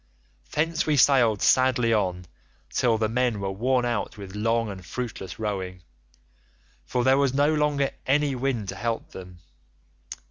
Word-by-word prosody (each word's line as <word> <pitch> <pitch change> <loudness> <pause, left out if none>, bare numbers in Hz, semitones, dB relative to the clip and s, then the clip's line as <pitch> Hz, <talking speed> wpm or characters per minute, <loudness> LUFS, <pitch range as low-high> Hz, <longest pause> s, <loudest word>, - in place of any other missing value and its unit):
"Thence 165 +2 0
we 150 -2 +2
sailed 120 -6 +4
sadly 125 -3 +3
on 90 -4 -1 0.5
till 115 -3 +2
the 110 0 +1
men 120 -1 0
were 100 -1 -2
worn 125 +5 +1
out 120 -3 -2
with 100 -2 -9
long 115 +1 0
and 95 -2 -9
fruitless 110 0 -6
rowing, 95 -4 -4 1.0
for 125 - 0
there 130 +2 +4
was 135 -2 +1
no 145 +2 +3
longer 150 -2 +1 0.2
any 145 +1 +2
wind 125 -5 -2
to 95 - -5
help 115 +4 -3
them. 90 -1 -10
115 Hz, 150 wpm, -25 LUFS, 100-130 Hz, 1.0 s, sailed